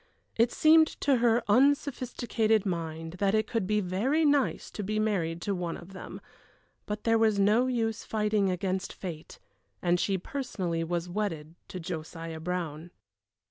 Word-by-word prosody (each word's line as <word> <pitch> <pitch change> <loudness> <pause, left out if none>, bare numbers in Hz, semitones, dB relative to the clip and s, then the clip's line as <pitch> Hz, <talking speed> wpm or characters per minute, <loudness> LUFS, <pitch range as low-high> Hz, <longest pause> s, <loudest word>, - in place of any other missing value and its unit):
It 230 +1 +3
seemed 315 0 +6
to 275 -2 +3
her 235 0 +3
unsophisticated 245 -3 +2
mind 165 -2 -4
that 200 +1 +2
it 215 0 +2
could 220 -4 -2
be 210 0 +2
very 230 - +1
nice 285 -2 +1
to - - -5
be 210 +2 -2
married 175 -6 0
to 200 - -1
one 175 -3 -3
of 180 +3 -12
them; 190 - -8 0.7
but 210 0 -4
there 225 -1 +3
was 220 -2 +3
no 215 +6 +4
use 225 -3 -1
fighting 210 -2 +1
against 185 +1 -2
fate, 165 -4 -8 0.4
and 175 0 +1
she 195 +1 +1
personally 185 -7 -3
was 170 +1 -2
wedded 175 -5 -3
to 185 - -7
Josiah 165 -1 -6
Brown. 165 -1 -4
200 Hz, 155 wpm, -29 LUFS, 175-225 Hz, 0.7 s, seemed